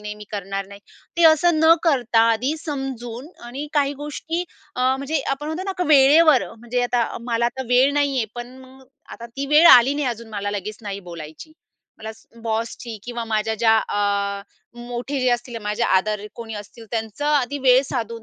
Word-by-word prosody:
नाही, 210 0 -6
मी 210 0 -11
करणार 195 -1 -4
नाही." 200 0 -13 0.4
ते 340 - +3
असं 325 +1 +2
न 320 +1 +7
करता 250 -8 +2
आधी 255 +8 0
समजून 265 -3 -5 0.2
आणि 270 +5 -6
काही 285 -1 +1
गोष्टी 320 +4 -4 0.3
अ, 250 - -4 0.2
म्हणजे 280 +3 -2
आपण 275 +2 -3
म्हणतो 315 +4 -4
ना 390 - -2
का, 360 - +1
वेळेवर. 295 0 +6
म्हणजे 240 +2 -3
आता 245 -1 +1 0.2
मला 235 -1 0
आता 265 +2 -4
वेळ 255 +3 +4
नाही 285 -2 +1
आहे, 235 - +1
पण 240 +2 -8
मग 260 0 -16 0.3
आता 235 - -9
ती 275 +4 -6
वेळ 300 +4 +6
आली 255 +3 +7
नाही 290 -2 -1
अजून 235 -1 -6
मला 205 -1 -3
लगेच 205 +1 -5
नाही 200 -1 -5
बोलायची. 160 - -10 0.5
मला 220 0 -7 0.3
बॉसची 225 +1 -4
किंवा 240 -1 -5
माझ्या 220 0 -1
ज्या 225 0 +3
अ, 200 -1 -1 0.4
मोठे 245 +3 -4
जे 255 - +2
असतील 240 0 -2
माझे 210 +3 -2
आदर 210 +2 +1
कोणी 225 -2 -7
असतील, 210 +3 -10
त्यांचं 225 +4 -4
आधी 285 -2 +1
वेळ 255 -1 +5
साधून 230 -3 -4
240 Hz, 185 wpm, -22 LUFS, 220-280 Hz, 0.5 s, न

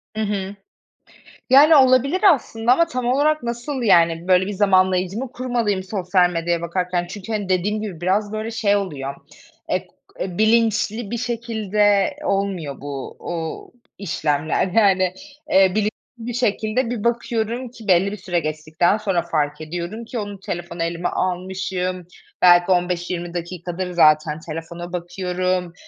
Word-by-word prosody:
Hı 220 - -2
hı. 200 -2 -2 0.9
Yani, 290 +5 +7
olabilir 270 +5 +4
aslında 235 -3 +1
ama 335 +6 +3
tam 255 -7 -4
olarak 290 +4 +2
nasıl, 240 +3 -4
yani, 170 -5 +3
böyle, 185 0 +4
bir - - -3
zamanlayıcı 185 -1 +2
mı 255 +1 -4
kurmalıyım 235 -6 -1
sosyal 185 -2 +1
medyaya 170 0 -1
bakarken. 175 +1 -2
Çünkü, 205 +3 -8
hani, 205 -3 -2
dediğim 205 +4 0
gibi 185 -6 -6
biraz, 205 +4 0
böyle, 215 +1 -3
şey 210 -3 +1
oluyor, 145 -9 -3 0.5
ek 185 0 -2 0.3
eee, 180 -2 -4
bilinçli 220 -1 +2
bir 235 - -1
şekilde 215 -4 +1
olmuyor 190 -9 -2
bu, 140 -2 -6
uuu, 165 -2 -6 0.2
işlemler. 155 -3 -1
Yani, 185 -2 +3 0.4
eee, 190 -1 +5
bilinçli 215 0 +1 0.3
bir 235 +1 -6
şekilde 230 +1 0
bir 235 -4 -3
bakıyorum 235 +1 -1
ki 225 -4 -13
belli 185 +2 +3
bir 210 - -6
süre 180 -2 -1
geçtikten 155 +4 0
sonra 195 -5 0
fark 150 -2 -2
ediyorum 175 +8 -5
ki 235 +1 -5
onu 205 -2 -6
telefonu 175 -2 -5
elime 170 +1 -2
almışım, 185 -1 -3 0.3
belki 175 +1 +6
15-20 175 -1 -1
dakikadır 175 +1 -5
zaten 155 -2 +3
telefona 170 +2 -7
bakıyorum. 180 0 -2
190 Hz, 140 wpm, -21 LUFS, 175-220 Hz, 0.9 s, Yani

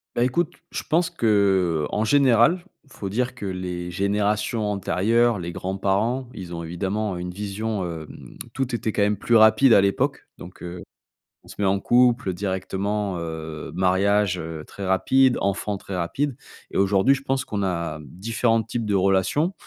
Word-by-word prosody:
Bah, 120 - +2
écoute, 150 +7 0 0.2
je - - -4
pense 165 +2 +1
qu'en 95 -5 +1
général, 135 +7 +4 0.2
faut 100 -6 -6
dire 125 +5 -1
que 115 - -7
les 90 -2 -4
générations 105 +4 0
antérieures, 110 +4 +2
les 85 -1 -5
grands-parents, 100 +8 -1
ils 90 -3 -8
ont 85 - -5
évidemment 95 +4 -2
une 90 0 -5
vision, 105 +1 -3
hem, 80 -3 -9 0.2
tout 135 -1 -2
était 115 -1 -1
quand 105 - -1
même 105 0 +1
plus 115 +4 +1
rapide 110 +3 +6
à 100 - +7
l'époque 100 0 0
donc, 90 +2 -12
heu, 90 0 -7 0.6
on - - -20
se - - -11
met 100 - 0
en 95 +1 +2
couple 120 -2 +3
directement, 95 +1 -2
heu, 80 -2 -6
mariage, 95 +1 +2
heu, 80 -2 -6
très 100 - -7
rapide, 130 +7 +3
enfant, 100 +1 -1
très 95 0 -7
rapide 130 +11 -1 0.4
et - - -3
aujourd'hui, 100 +7 +4
je 135 - -7
pense 135 -1 -1
qu'on 105 -5 -3
a 85 -4 -2
différents 115 - 0
types 115 +1 -4
de 105 -1 0
relation. 95 - +2
100 Hz, 165 wpm, -23 LUFS, 90-115 Hz, 0.6 s, à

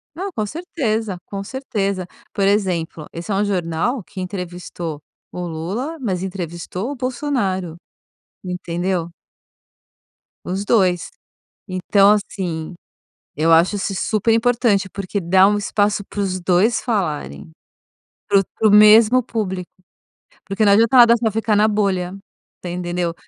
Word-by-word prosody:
Não, 385 +4 -4
com 220 -11 -2
certeza, 225 - -3
com 195 -1 -6
certeza. 200 -7 -3 0.3
Por 195 -1 +1
exemplo, 180 -6 0
esse 170 +5 -6
é - - 0
um 200 - +2
jornal 190 +5 -1
que 190 0 -9
entrevistou 175 -4 -6 0.3
o 180 - -6
Lula, 195 - -4
mas 190 -8 -2
entrevistou 180 +2 -5
o - - -5
Bolsonaro. 240 - -2 0.7
Entendeu? 180 -1 -3 1.4
Os 190 +2 -2
2. 185 -5 +2 0.6
Então, 195 +2 +3
assim, 185 -5 -3 0.6
eu 165 +2 +3
acho 170 +5 +4
is 195 - -2
isso 190 - -2
super 220 +1 +2
importante, 230 -4 +2
porque 200 +1 -4
dá 185 +3 +5
um 205 +1 +2
espaço 205 0 0
pros 195 -2 -2
2 190 +7 +2
falarem. 185 - -3 0.8
Pro 195 -1 +4
pro 220 - +3
mesmo 215 +4 +7
público 190 -6 -4 0.8
porque 195 +3 0
não 200 - +5
adianta 230 +5 +4
nada 235 -1 +8
só 225 -1 0
ficar 220 0 +1
na 210 +1 +5
bolha, 195 -4 0 0.5
te 180 - -5
entendeu? 175 -1 -2
195 Hz, 130 wpm, -20 LUFS, 180-220 Hz, 1.4 s, nada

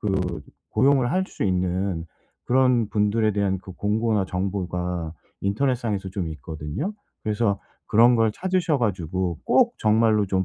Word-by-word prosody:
그 90 -6 -1 0.3
고용을 135 -2 +3
할 185 +1 +2
수 - - -4
있는 90 -2 0 0.4
그런 125 -3 +3
분들에 110 +1 +2
대한 100 -2 0
그 95 - -12
공고나 105 0 0
정보가 90 -3 -3 0.3
인터넷상에서 105 -2 0
좀 95 -2 -3
있거든요. 80 - -5 0.3
그래서 105 -2 0 0.3
그런 120 +3 +6
걸 115 -1 +3
찾으셔 185 - 0
가지고 90 -5 -1
꼭 - - +4
정말로 110 -1 +3
좀 95 0 0
100 Hz, 285 characters per minute, -24 LUFS, 90-115 Hz, 0.4 s, 그런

